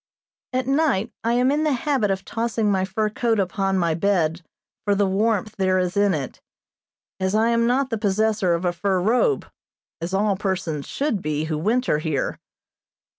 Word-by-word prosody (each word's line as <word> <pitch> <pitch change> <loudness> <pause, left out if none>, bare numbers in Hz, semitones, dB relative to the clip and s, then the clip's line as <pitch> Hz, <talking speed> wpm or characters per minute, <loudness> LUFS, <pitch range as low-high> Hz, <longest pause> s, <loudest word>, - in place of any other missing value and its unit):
At 255 0 -1
night 270 -6 +1
I 230 +1 +1
am 250 +2 +3
in 300 +2 +1
the 305 -2 +2
habit 260 -4 0
of 195 0 -2
tossing 225 -2 -1
my 190 -1 +1
fur 215 +3 -1
coat 225 0 0
upon 195 0 0
my 170 -3 +1
bed 170 -2 +1 0.4
for 205 -1 +2
the 200 0 +2
warmth 210 +2 0
there 185 -1 +2
is 180 -1 -1
in 200 -3 +3
it, 140 -3 -6 0.8
as 190 +2 0
I 225 +2 +3
am 230 0 +2
not 260 +2 +1
the 225 - -1
possessor 210 -3 +1
of 170 +2 -3
a 175 - +1
fur 190 +2 0
robe, 245 - +2 0.6
as 175 +3 -2
all 205 0 +2
persons 180 -7 -3
should 275 -9 -1
be 150 0 -1
who 155 -1 -2
winter 220 -2 +1
here. 155 -4 -2
200 Hz, 180 wpm, -23 LUFS, 185-230 Hz, 0.8 s, am